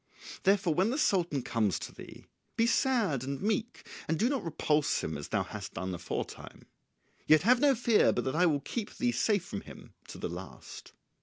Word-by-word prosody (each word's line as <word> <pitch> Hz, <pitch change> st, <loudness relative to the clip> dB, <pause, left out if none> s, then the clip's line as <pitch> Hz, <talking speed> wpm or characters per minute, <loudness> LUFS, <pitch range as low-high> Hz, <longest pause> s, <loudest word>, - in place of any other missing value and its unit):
Therefore 195 Hz, -4 st, +3 dB
when 185 Hz, +7 st, +2 dB
the 260 Hz, -, -1 dB
Sultan 175 Hz, -, +1 dB
comes 110 Hz, -6 st, 0 dB
to -, -, -7 dB
thee, -, -, -12 dB, 0.3 s
be 230 Hz, -, +4 dB
sad 230 Hz, -, +1 dB
and 135 Hz, +1 st, -4 dB
meek 220 Hz, +3 st, -2 dB, 0.2 s
and 160 Hz, -, 0 dB
do 230 Hz, +7 st, +2 dB
not 275 Hz, -5 st, -1 dB
repulse 150 Hz, -2 st, 0 dB
him 80 Hz, -, -3 dB
as 70 Hz, 0 st, -6 dB
thou -, -, 0 dB
hast -, -, -8 dB
done 95 Hz, +2 st, -3 dB
aforetime. 90 Hz, +1 st, -6 dB, 0.6 s
Yet 155 Hz, +1 st, +6 dB
have 245 Hz, +4 st, +5 dB
no 280 Hz, -1 st, +4 dB
fear 230 Hz, -2 st, +4 dB
but -, -, -1 dB
that 130 Hz, -, -2 dB
I 180 Hz, +2 st, +4 dB
will 145 Hz, -4 st, +1 dB
keep 215 Hz, -, -5 dB
thee 245 Hz, -1 st, +1 dB
safe 205 Hz, -6 st, +1 dB
from 100 Hz, -, -5 dB
him -, -, -13 dB
to -, -, -9 dB
the -, -, -3 dB
last." -, -, -9 dB
180 Hz, 200 wpm, -30 LUFS, 140-230 Hz, 0.6 s, Yet